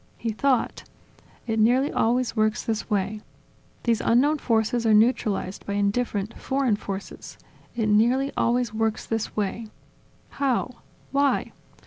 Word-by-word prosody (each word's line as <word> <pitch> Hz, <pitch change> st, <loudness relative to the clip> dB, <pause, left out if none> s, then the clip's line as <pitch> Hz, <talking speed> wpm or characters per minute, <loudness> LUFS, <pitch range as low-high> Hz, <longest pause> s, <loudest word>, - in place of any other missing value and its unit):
He 230 Hz, -, -2 dB
thought: 255 Hz, +2 st, 0 dB, 0.6 s
"It 225 Hz, -2 st, -1 dB
nearly 250 Hz, +6 st, +3 dB
always 240 Hz, +1 st, +1 dB
works 215 Hz, -1 st, +1 dB
this 220 Hz, 0 st, -3 dB
way. 210 Hz, 0 st, -1 dB, 0.6 s
These 230 Hz, -2 st, +1 dB
unknown 285 Hz, +6 st, +3 dB
forces 230 Hz, 0 st, +1 dB
are 220 Hz, -2 st, +4 dB
neutralized 215 Hz, -4 st, +1 dB
by 200 Hz, -, -2 dB
indifferent, 205 Hz, +1 st, -1 dB
foreign 265 Hz, -5 st, +1 dB
forces. 195 Hz, -1 st, -7 dB, 0.4 s
It 230 Hz, -2 st, 0 dB
nearly 240 Hz, +6 st, +3 dB
always 240 Hz, -1 st, +1 dB
works 220 Hz, 0 st, -1 dB
this 225 Hz, -1 st, -3 dB
way. 215 Hz, +2 st, -2 dB, 0.6 s
How? 260 Hz, -2 st, 0 dB, 0.4 s
Why? 280 Hz, 0 st, +1 dB
225 Hz, 125 wpm, -25 LUFS, 215-250 Hz, 0.6 s, are